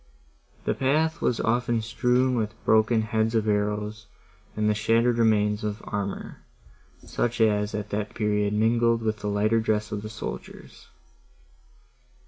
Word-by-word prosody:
The - - +1
path 155 +5 0
was 120 - +1
often 120 0 +1
strewn 125 +3 +1
with 110 -2 -2
broken 110 +1 +3
heads 110 +1 0
of 110 -1 +1
arrows, 105 +1 -1 0.5
and 105 0 0
with 105 - +2
shattered 115 +2 +2
remains 105 -2 +2
of 105 0 -3
armour, 100 -2 -5 0.6
such 120 0 -2
as 105 -2 +2
at 105 -1 -5
that 105 0 -3
period 105 -1 0
was 105 - 0
mingled 115 +1 +2
with 110 -1 -1
the 105 - -4
lighter 105 +2 +2
dress 105 -1 -1
of 105 - -3
the 105 - -7
soldiers. 105 - -8
110 Hz, 145 wpm, -26 LUFS, 105-115 Hz, 0.6 s, broken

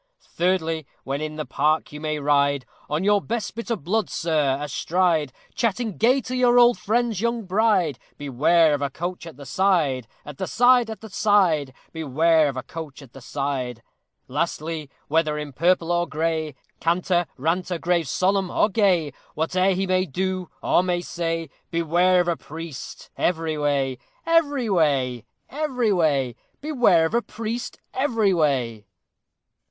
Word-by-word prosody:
Thirdly, 165 -4 0 0.2
when 140 +2 -3
in 155 0 -4
the 155 -1 -4
park 155 +2 0
you 150 0 -8
may 155 -1 -2
ride, 140 -2 +2 0.2
On 150 +4 -1
your 205 0 +3
best 225 0 -3
bit 230 +1 -7
of 225 -10 -2
blood, 210 +5 0
sir, 150 -5 0
astride, 155 +1 0 0.2
Chatting 230 -2 -1
gay 255 +5 +3
to 255 +1 -5
your 245 -1 +4
old 240 0 +6
friend's 225 -1 0
young 235 0 0
bride: 190 - +1 0.2
Beware 150 +4 +3
of 145 - -1
a 140 - 0
coach 175 +4 -5
at 160 - -11
the 140 - -10
side! 140 - +1 0.2
At 145 -2 -10
the - - -2
side! 245 -1 +4
at 220 - -7
the 220 - -9
side! 190 -9 +2 0.2
Beware 160 0 +2
of 135 - -6
a 130 - -4
coach 150 -1 -8
at 125 - -17
the 135 - -12
side! 130 -3 -3 0.4
Lastly, 155 +1 -3 0.2
whether 155 -1 +1
in 150 -2 -6
purple 170 +3 +2
or 175 0 +1
gray, 160 -2 -2 0.2
Canter, 175 +1 +1
ranter, 175 +5 -1
grave, 170 -1 0
solemn, 190 +5 +1
or 210 - +2
gay, 185 - +2 0.2
Whate'er 185 +5 +1
he 190 +1 0
may 185 0 +1
do 185 +3 -2
or - - +4
may 180 -1 -1
say, 165 -1 -3 0.2
Beware 175 +2 +3
of 175 - -3
a 170 - +1
priest 160 -3 -9
every 165 -2 0
way! 140 -3 0 0.3
Every 290 -7 +2
way! 140 - +1 0.2
every 260 -7 0
way! 140 -8 +1 0.3
Beware 245 - +3
of 160 - -3
a 235 - +3
priest 230 +2 -5 0.2
every 230 -7 +1
way! 125 - 0
165 Hz, 160 wpm, -23 LUFS, 150-195 Hz, 0.4 s, old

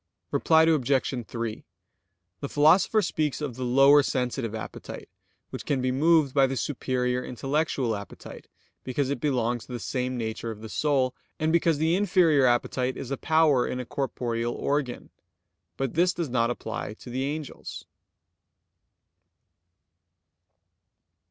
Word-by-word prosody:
Reply 160 -1 +4
Obj. 135 -5 +1
3: 115 -2 -4 0.8
The 140 - -5
Philosopher 175 +8 +4
speaks 155 -5 -1
of 145 -4 -4
the 130 - -5
lower 135 +4 +6
sensitive 125 -4 -2
appetite 110 - -8 0.4
which - - -6
can 140 - 0
be 130 0 0
moved 150 0 +3
by 135 -2 +4
the 135 0 -3
superior 125 -1 -1
intellectual 135 -2 -1
appetite, 100 0 -10 0.4
because 130 +1 -1
it 140 - -2
belongs 120 -4 -1
to 125 - -8
the 120 - -4
same 125 +2 -2
nature 115 0 -4
of 110 -1 -7
the 110 - -8
soul, 135 -1 +1 0.3
and 160 0 +1
because 165 -2 +3
the 160 +3 +2
inferior 175 -8 +4
appetite 125 +1 0
is 135 - -7
a - - +1
power 155 -3 +3
in 125 - -3
a 125 - -4
corporeal 120 -3 -2
organ. 140 -3 -2 0.7
But 135 -2 -2
this 175 +2 +3
does 170 -5 -3
not 120 -1 +1
apply 110 -3 -5
to 120 - -11
the 130 +2 -2
angels. 150 0 -6
130 Hz, 140 wpm, -26 LUFS, 120-150 Hz, 0.8 s, lower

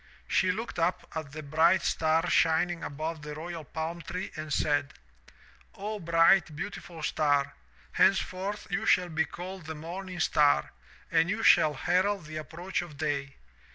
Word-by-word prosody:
She 185 - +2
looked 220 0 -5
up 170 +2 0
at 155 -3 -5
the 155 +1 -7
bright 160 +5 +3
star 160 0 +1
shining 165 +1 +2
above 155 +2 -4
the 150 0 -7
royal 165 +1 -6
palm 160 +4 -5
tree 180 +3 -5
and 155 -1 -6
said, 145 -1 0 0.8
'O, 210 +2 -4
bright, 165 -1 +4
beau 185 +8 -3
tiful 165 -5 -10
star, 145 -2 +1 0.4
henceforth 195 +1 +1
you 220 +3 -1
shall 180 -1 +4
be 160 -1 +1
called 180 0 -8
the 160 - -5
morning 180 +4 -7
star 145 - +3 0.4
and 165 +1 +3
you 215 +3 -1
shall 150 -1 +6
herald 185 +5 +1
the 155 0 -7
approach 170 +5 -4
of 165 -5 -10
day. 140 -2 -2
165 Hz, 155 wpm, -29 LUFS, 155-185 Hz, 0.8 s, shall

